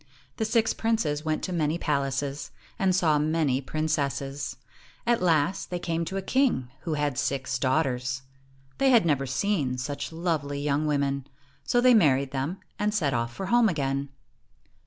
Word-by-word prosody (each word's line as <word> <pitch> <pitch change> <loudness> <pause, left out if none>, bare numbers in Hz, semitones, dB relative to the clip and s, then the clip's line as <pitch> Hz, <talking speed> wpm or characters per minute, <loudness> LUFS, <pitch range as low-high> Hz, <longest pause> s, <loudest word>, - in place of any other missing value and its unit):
The 220 - 0
six 225 0 +2
princes 170 -10 0
went 155 -1 -1
to 185 - -2
many 160 -1 +1
palaces, 140 -2 -1 0.3
and 190 -1 +3
saw 155 -5 +3
many 150 -3 +1
princesses. 140 -2 -2 0.5
At 235 -3 +2
last, 170 +1 +1
they 180 - -2
came 170 -1 -2
to 190 +4 -4
a 195 - -3
king 240 - +1
who 160 -2 -3
had 145 -3 -1
six 130 -2 -1
daughters. 130 -2 0 0.6
They 275 - +4
had 235 -8 +5
never 140 -4 +1
seen 135 -2 0
such 140 +3 -4
lovely 160 -4 -2
young 145 +1 0
women, 140 -2 0 0.4
so 245 - +2
they 250 0 +6
married 140 - +4
them, 140 +7 -2 0.2
and 210 +1 0
set 150 -9 +1
off 115 0 -1
for 190 +11 -5
home 235 +3 +4
again. 140 -4 -1
150 Hz, 160 wpm, -27 LUFS, 135-180 Hz, 0.6 s, they